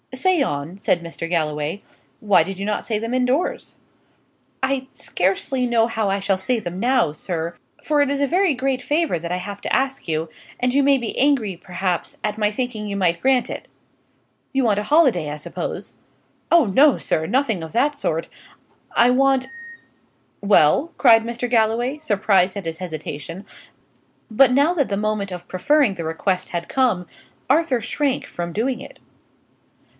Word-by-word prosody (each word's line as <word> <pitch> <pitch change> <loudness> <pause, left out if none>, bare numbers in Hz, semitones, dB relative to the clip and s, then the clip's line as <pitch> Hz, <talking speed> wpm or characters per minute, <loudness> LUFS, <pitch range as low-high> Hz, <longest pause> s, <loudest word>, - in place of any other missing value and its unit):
"Say 355 +4 +2
on," 155 - -3
said 180 -3 +1
Mr. 165 0 -6
Galloway. 155 +2 -2 0.4
"Why 205 -3 +4
did 195 0 -7
you 200 - -3
not 210 0 -1
say 220 - -1
them 230 +2 -4
indoors?" 255 +5 -1 0.8
"I 265 0 -1
scarcely 220 +8 -1
know 230 -1 +3
how 220 -3 -1
I 195 +1 0
shall 195 -1 0
say 235 +5 0
them 180 -3 -6
now, 245 - +2
sir; 165 +1 -4 0.3
for 300 -1 +2
it 285 - +2
is 280 0 -1
a 280 - +2
very 360 +1 +2
great 260 0 -1
favour 300 - 0
that 170 +1 -6
I 180 - 0
have 200 +2 -7
to - - -3
ask 270 -4 0
you, 160 0 -1 0.3
and 250 0 +1
you 280 - +4
may 275 0 +4
be 235 -4 -5
angry, 255 -9 +2
perhaps, 180 0 -3
at 210 0 -2
my 210 -1 +2
thinking 220 -2 -4
you 200 -1 -3
might 170 -3 +1
grant 255 -2 +2
it." - - -7 0.8
"You 270 -2 +1
want 205 -3 +2
a - - -2
holiday, 255 - +3
I 150 - -5
suppose?" 145 - -6 0.6
"Oh 340 -4 +6
no, 270 +8 +4
sir; 160 - -1
nothing 225 - 0
of 160 - -8
that 290 +5 +1
sort. 165 - -2 0.7
I 240 +1 +5
want 270 0 +3 0.5
" - - -41
"Well?" 200 - +4
cried 225 -4 +6
Mr. 235 +1 -4
Galloway, 235 +4 +1
surprised 200 -7 +2
at 200 - -6
his 165 0 -4
hesitation; 165 +1 -6 0.8
but 250 +4 +5
now 285 +6 +3
that 290 -7 0
the 200 - -1
moment 210 -2 -2
of 180 -1 -7
preferring 275 +5 +2
the 175 -3 -6
request 180 +3 -2
had 170 -1 -4
come, 225 -10 +1 0.4
Arthur 280 -3 +3
shrank 270 +4 -1
from 175 0 -5
doing 240 +6 -1
it. - - -12
220 Hz, 175 wpm, -21 LUFS, 180-265 Hz, 0.8 s, Oh